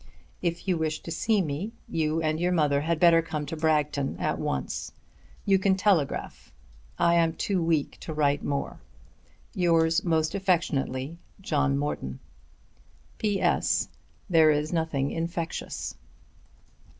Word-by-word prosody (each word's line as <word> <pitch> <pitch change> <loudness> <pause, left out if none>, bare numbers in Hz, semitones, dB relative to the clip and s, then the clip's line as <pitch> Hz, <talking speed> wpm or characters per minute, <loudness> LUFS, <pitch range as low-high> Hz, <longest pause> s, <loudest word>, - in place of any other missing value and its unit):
If 170 +1 -2
you 180 -2 +2
wish 155 -1 -1
to 165 - -6
see 205 +4 +1
me, 165 +9 -4
you 160 0 0
and 155 0 0
your 175 +1 +1
mother 150 -5 +2
had 165 +1 0
better 170 -1 +6
come 155 -2 -4
to 155 - -5
Bragton 150 -3 0
at - - -1
once. 65 -2 -3 0.5
You 195 -1 +4
can 190 0 +3
telegraph. 185 -8 0 0.5
I 170 0 +3
am 165 -1 +3
too 190 +1 -1
weak 165 -3 0
to - - -7
write 145 -2 +1
more. 140 -1 -3 0.7
Yours 165 -1 +3
most 160 -2 +1
affectionately, 170 -6 -1 0.2
JOHN 145 -6 +1
MORTON. 65 - -3 1.0
There 185 -4 +1
is 150 +2 +1
nothing 160 -4 0
infectious. 165 0 -4
160 Hz, 125 wpm, -27 LUFS, 150-175 Hz, 1.0 s, better